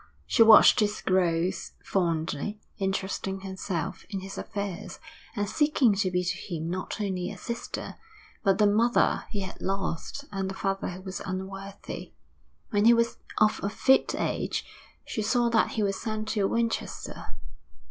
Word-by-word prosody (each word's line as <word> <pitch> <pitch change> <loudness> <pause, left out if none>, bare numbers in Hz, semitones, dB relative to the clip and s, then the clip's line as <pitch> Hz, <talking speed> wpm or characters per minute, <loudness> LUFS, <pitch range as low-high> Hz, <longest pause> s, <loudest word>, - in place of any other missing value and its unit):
She 90 - +2
watched 220 -1 +9
his 210 -1 +1
growth 180 -1 +1
fondly, 170 +2 -1 0.2
interesting 195 0 -2
herself 190 -3 -4
in 195 -2 -3
his 195 +1 -7
affairs, 200 -2 -5 0.4
and 205 -2 0
seeking 290 -4 +3
to 195 -2 +2
be 180 0 0
to 180 - -1
him 165 -2 -4
not 185 +4 -4
only 190 -3 -2
a 205 - -7
sister, 235 +6 -5 0.5
but 195 -2 +4
the 210 - +5
mother 225 +4 +3
he 205 -3 -3
had 190 0 -7
lost 195 +7 -3
and 195 -1 -2
the 195 - -5
father 195 0 -1
who 180 +1 -7
was 190 0 -5
unworthy. 195 +1 -6 0.6
When 205 0 +3
he 235 +1 +8
was 230 0 +1 0.2
of 215 0 +4
a 200 - 0
fit 265 +5 +3
age - - -1 0.4
she 220 - -3
saw 240 +2 +2
that 230 -1 +2
he 220 - 0
was 195 -1 -1
sent 215 -1 -3
to 205 -3 +1
Winchester. 230 - -3
195 Hz, 160 wpm, -28 LUFS, 185-215 Hz, 0.6 s, watched